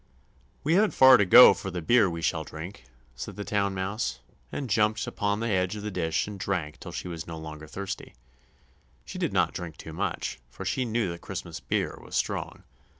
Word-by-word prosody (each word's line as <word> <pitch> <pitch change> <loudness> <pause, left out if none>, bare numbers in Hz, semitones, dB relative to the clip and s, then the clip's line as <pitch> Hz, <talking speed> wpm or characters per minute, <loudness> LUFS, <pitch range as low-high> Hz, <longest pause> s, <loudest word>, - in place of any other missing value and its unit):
"We 155 - +2
haven't 205 +4 +3
far 130 -1 +9
to 105 - +3
go 125 +7 +10
for 95 - -6
the 90 -1 -4
beer 105 +4 +4
we 85 -1 -5
shall 80 -1 0
drink," 80 -1 -9 0.3
said 70 +11 -7
the 105 - -5
Town 100 -2 0
Mouse, 95 - -2 0.3
and 140 - -4
jumped 105 0 +2
upon 105 0 -1
the 115 - -1
edge 90 +1 +1
of 105 - -6
the 105 - -3
dish 80 -4 0
and 105 -2 -7
drank 85 -6 -2
till - - -8
she - - -5
was 85 -3 -6
no 80 -1 -6
longer 80 -1 -8
thirsty; 95 +4 -6 0.9
she - - -7
did - - 0
not - - +2
drink 85 -3 -6
too - - -9
much, - - -3
for - - -9
she 130 - 0
knew 115 -5 0
the 85 - -7
Christmas 85 -3 -6
beer - - -2
was - - -9
strong. - - -2
95 Hz, 210 wpm, -27 LUFS, 80-105 Hz, 0.9 s, go